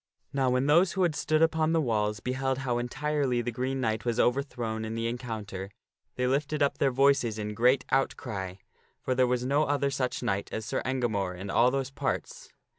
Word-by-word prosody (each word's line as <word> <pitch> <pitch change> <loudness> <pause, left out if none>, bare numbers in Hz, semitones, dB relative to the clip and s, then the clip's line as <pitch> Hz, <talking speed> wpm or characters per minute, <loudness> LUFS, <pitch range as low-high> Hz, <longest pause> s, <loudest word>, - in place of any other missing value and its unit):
Now 135 -2 +2
when 125 +1 +2
those 170 +5 +4
who 190 - +1
had 170 -3 +2
stood 155 +2 +2
upon 160 0 +2
the 165 - +3
walls 105 -6 0
beheld 130 +1 -1
how 125 -3 -1
entirely 135 0 -1
the 120 - -2
Green 130 +3 -2
Knight 110 -3 -1
was 120 -1 -1
overthrown 120 -4 0
in 110 0 -4
the 115 0 -2
encounter, 110 -5 -4 0.5
they 125 - 0
lifted 145 +3 +1
up 140 - 0
their 140 - +3
voices 135 -4 +3
in 105 0 -4
great 125 +4 +3
outcry; 100 -8 -1 0.5
for 130 - 0
there 130 0 +3
was 125 0 0
no 145 +4 +2
other 140 -1 0
such 130 -2 -2
knight 100 -4 -1
as 110 - -4
Sir - - -2
Engamore 110 -8 -1
in 100 +2 -5
all 120 +4 +5
those 135 0 -2
parts. - - -3
125 Hz, 195 wpm, -28 LUFS, 115-140 Hz, 0.5 s, all